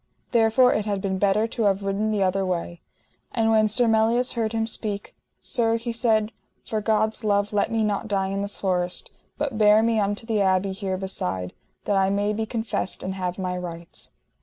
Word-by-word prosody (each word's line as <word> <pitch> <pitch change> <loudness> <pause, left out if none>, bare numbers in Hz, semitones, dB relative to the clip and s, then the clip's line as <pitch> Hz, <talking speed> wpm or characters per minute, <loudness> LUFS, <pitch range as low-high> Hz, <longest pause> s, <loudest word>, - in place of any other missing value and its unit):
therefore 235 +2 +4
it 210 - -1
had 200 -2 -1
been 190 -1 -2
better 205 +2 +3
to 230 -1 -2
have 200 0 +2
ridden 195 +2 -1
the 210 -2 +1
other 190 +1 +1
way. 175 -2 -3 0.5
And 225 -1 +2
when 215 -1 +4
Sir 230 +4 +2
Melias 225 +3 +2
heard 225 -2 -1
him 225 -1 0
speak: 210 -2 -4 0.2
Sir, 230 -2 0
he 235 +1 -4
said, 225 -2 +1 0.3
for 215 -1 -2
God's 220 +1 +1
love 205 0 +1
let 205 - +1
me 225 -1 +1
not 210 +1 -1
die 195 -2 0
in 195 +1 -2
this 200 0 -2
forest, 180 -2 -1 0.3
but 275 -7 -2
bear 210 +1 +6
me 225 -1 +2
unto 205 +2 -1
the 220 -3 0
abbey 190 0 +2
here 190 -1 -3
beside, 95 - -3 0.3
that 205 - +1
I 190 0 +3
may 205 +1 0
be 220 +1 -2
confessed 220 -5 -3
and 190 - -3
have 180 -1 -3
my 185 -1 -2
rights. 170 -2 -8
205 Hz, 200 wpm, -24 LUFS, 190-225 Hz, 0.5 s, bear